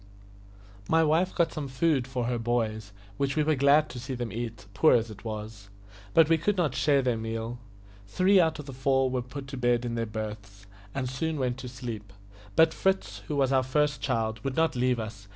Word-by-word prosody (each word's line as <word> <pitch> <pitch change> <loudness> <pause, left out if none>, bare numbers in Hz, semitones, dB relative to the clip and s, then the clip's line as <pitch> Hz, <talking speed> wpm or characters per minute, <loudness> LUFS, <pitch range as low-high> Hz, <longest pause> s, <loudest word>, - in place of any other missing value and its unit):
My 160 0 +4
wife 165 +4 +2
got 170 -2 +1
some 150 -3 -4
food 135 -1 +1
for 125 -2 -2
her 120 0 -1
boys, 110 -3 -1 0.3
which 140 0 0
we 155 - +2
were 155 +1 +2
glad 145 +2 +4
to 125 - -7
see 130 +2 -5
them 120 -2 -4
eat, 115 -2 -5
poor 155 +8 +5
as 115 -1 0
it 105 0 -12
was; 105 -2 -7 0.5
but 165 -2 +7
we 165 0 +3
could 200 +5 0
not 160 -7 +1
share 135 +2 +2
their 125 -3 0
meal. 115 +1 -4 0.5
Three 185 - +4
out 160 -2 +2
of 150 - -8
the 135 - -8
four 130 0 +1
were 125 -1 0
put 135 +3 -8
to 135 - -6
bed 120 -1 +1
in 120 - -3
their 115 -1 -2
berths, 105 -2 -7 0.3
and 135 -2 -1
soon 155 +5 -2
went 130 -2 -1
to 125 - -6
sleep; 115 -5 -7 0.4
but 160 0 +5
Fritz, 190 - 0
who 150 - -2
was 135 -2 +2
our 135 -1 +4
first 145 +1 0
child, 110 -4 -1
would 135 -1 -2
not 160 -3 +2
leave 125 -1 +1
us. 105 -2 -7
125 Hz, 215 wpm, -28 LUFS, 115-150 Hz, 0.5 s, but